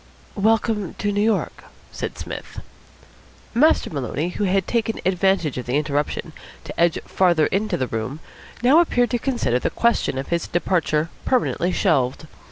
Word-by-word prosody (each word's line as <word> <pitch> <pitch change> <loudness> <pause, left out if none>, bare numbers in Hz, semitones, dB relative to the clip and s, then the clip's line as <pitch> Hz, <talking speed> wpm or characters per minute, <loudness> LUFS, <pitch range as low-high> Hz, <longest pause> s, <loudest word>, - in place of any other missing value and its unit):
"Welcome 215 -2 +1
to 205 - -1
New 205 0 0
York," 220 0 0 0.3
said - - -5
Psmith. - - -7 0.9
Master 305 +7 +3
Maloney, 145 +3 -2
who 205 +3 -2
had 190 0 +1
taken 230 -1 -1
advantage 185 -6 +1
of 125 - -7
the 125 +3 +1
interruption 150 -1 -2 0.3
to - - -8
edge 170 -1 +3
farther 175 -5 +3
into 210 +3 0
the 130 - 0
room, 120 +5 -4 0.4
now 270 +7 +6
appeared 245 -9 +2
to 240 - 0
consider 235 - 0
the - - -1
question 235 - +1
of 135 - -4
his 170 -1 -1
departure 165 -3 0
permanently 230 -8 +1
shelved. 155 -7 +1
185 Hz, 155 wpm, -22 LUFS, 150-220 Hz, 0.9 s, now